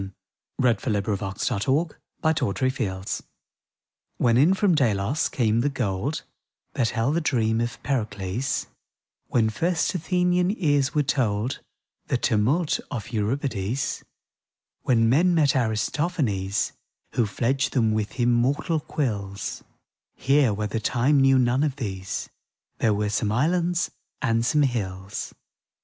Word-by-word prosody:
•^ - - -3 0.5
THE - - -1
WHITE 120 +2 0 0.3
LIGHTS 95 -2 -3
(BROADWAY, 135 +9 0 0.3
1906) 115 - 0 1.0
When 115 -1 +3
in 155 +10 +5
from 195 -2 +3
Delos 120 -1 +1
came 115 -3 +1
the 145 - +1
gold 125 +1 -2 0.5
That 115 - +1
held 125 +7 0
the - - +1
dream 115 -6 +1
of 120 0 -3
Pericles, 110 -1 -2 0.6
When 110 -2 +2
first 165 - 0
Athenian 180 +2 +1
ears 145 -2 +1
were 150 - +3
told 125 -4 0 0.5
The - - +1
tumult 135 +10 +1
of 120 -7 -5
Euripides, 115 +1 -1 0.8
When 115 -2 +3
men 170 +9 +4
met 145 -4 +3
Aristophanes, 110 - 0 0.4
Who 115 -2 +1
fledged 130 +6 0
them 115 -4 +2
with 110 +3 -2
immortal 125 +7 +2
quills 100 -10 -3 0.2
— - - -66
Here, 135 -3 +3
where 105 +1 -2
the 110 +2 -2
time 130 +5 +2
knew 135 0 +5
none 125 +1 +2
of 145 -3 0
these, 95 -8 -4 0.5
There 110 -2 +2
were 105 0 0
some 105 0 0
islands 170 +8 +1 0.3
and 115 -2 +1
some 150 +5 +3
hills. 95 -7 -3
125 Hz, 130 wpm, -25 LUFS, 110-145 Hz, 1.0 s, in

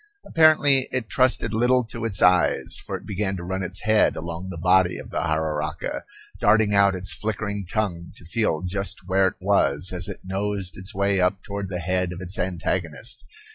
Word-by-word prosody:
Apparently 145 -4 +4
it 125 -4 -2
trusted 125 -3 +2
little 125 +3 +3
to 115 0 -6
its 100 -5 0
eyes, 90 0 +3
for - - -4
it - - -15
began 100 -1 -2
to 90 - -7
run 95 +2 -3
its 95 +1 -5
head 110 0 +3
along 85 +2 -6
the 90 - -6
body 90 +1 +3
of - - -10
the - - -1
jararaca, 80 -1 -2 0.3
darting 105 0 +3
out 100 -1 +4
its 95 +1 -3
flickering 105 -2 -4
tongue 90 -6 -2
to - - -14
feel 90 -2 -1
just 95 0 -3
where 95 0 +3
it 90 - -3
was, 90 -4 +2
as 90 -1 0
it - - -7
nosed 95 -1 -2
its 95 +4 -8
way 100 0 +1
up 95 +2 0
toward 100 -1 -5
the 90 - -3
head 90 +1 -1
of 90 - -8
its 95 +1 -4
antagonist. 90 - -3
95 Hz, 190 wpm, -24 LUFS, 90-105 Hz, 0.3 s, Apparently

